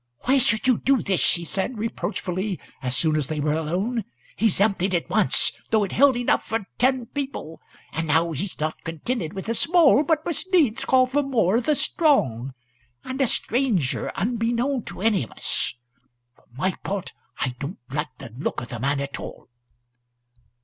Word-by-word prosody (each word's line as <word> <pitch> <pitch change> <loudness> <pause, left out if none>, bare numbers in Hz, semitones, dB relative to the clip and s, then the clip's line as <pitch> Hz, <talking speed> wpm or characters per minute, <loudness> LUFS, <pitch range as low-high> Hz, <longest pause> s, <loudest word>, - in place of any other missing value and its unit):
"Why 270 +2 +3
should 230 -1 +3
you 250 -3 +4
do 270 -2 +2
this?" 190 -3 +1
she 170 -1 +3
said, 195 +8 -1
reproachfully, 190 -2 -3 0.2
as 125 -1 0
soon 155 -2 +3
as 150 -4 0
they 155 -1 -3
were 150 +1 +1
alone. 185 +10 -1 0.3
"He's 220 -3 +2
emptied 195 -2 +2
it 170 - -1
once, - - +3 0.2
though 220 -2 +3
it 195 - -3
held 270 -1 +4
enough 245 - +1
for 225 -3 -3
ten 255 -1 +2
people; 265 - -6 0.3
and 160 +1 -2
now 165 +2 +2
he's 175 +6 -5
not 155 +1 -3
contented 165 - -3
wi' 195 - -4
the 230 - -2
small, 305 +2 +5
but 310 0 +1
must 350 +2 -4
needs 275 - +3
call 260 -1 +5
for 270 +3 +1
more 230 -8 +2
o' - - +1
the 300 +5 +1
strong! 135 - +1 0.5
And 260 +1 -4
a 265 - +4
stranger 225 - 0
unbeknown 235 +4 0
to - - -8
any 215 -3 +3
of 115 - -5
us! - - -1 0.6
For - - -28
my 185 +6 +1
part, 195 -2 -3 0.3
I 125 - -1
don't 145 +7 -5
like 140 -3 -3
the 115 - -10
look 135 - -2
o' - - -5
the 120 -1 -7
man 140 +3 0
at 140 0 -5
all." - - -9
205 Hz, 185 wpm, -24 LUFS, 160-255 Hz, 0.6 s, small